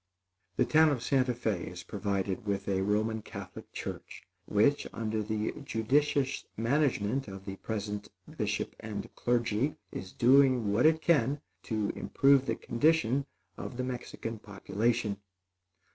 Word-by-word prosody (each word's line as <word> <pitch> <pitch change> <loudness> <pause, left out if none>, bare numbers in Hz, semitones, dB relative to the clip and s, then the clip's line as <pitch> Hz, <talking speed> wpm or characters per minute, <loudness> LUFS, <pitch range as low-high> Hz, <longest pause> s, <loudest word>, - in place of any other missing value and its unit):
The - - +3
town 160 0 +5
of 130 -5 -1
Santa 130 -3 +2
Fé 110 -7 -2
is 90 -1 -7
provided 100 +2 -2
with 100 -1 -1
a 95 -1 +1
Roman 110 +3 +1
Catholic - - -9
church, - - -7 0.2
which, 110 +8 +3
under 110 -1 -2
the 105 0 -2
judicious 140 +3 +1
management 130 -1 +1
of 95 -1 -8
the 95 -1 -6
present 105 -1 -4 0.3
bishop - - -2
and 105 -2 -6
clergy, 120 +3 +1 0.2
is 95 - -6
doing 130 -4 +4
what 125 +9 +5
it 160 0 +2
can 145 -3 +3 0.3
to 110 -4 0
improve 135 -1 +3
the - - +1
condition 140 0 +2 0.3
of 120 - -6
the 130 - -1
Mexican 120 -3 -5
population. 105 +1 -1
115 Hz, 135 wpm, -31 LUFS, 105-135 Hz, 0.3 s, town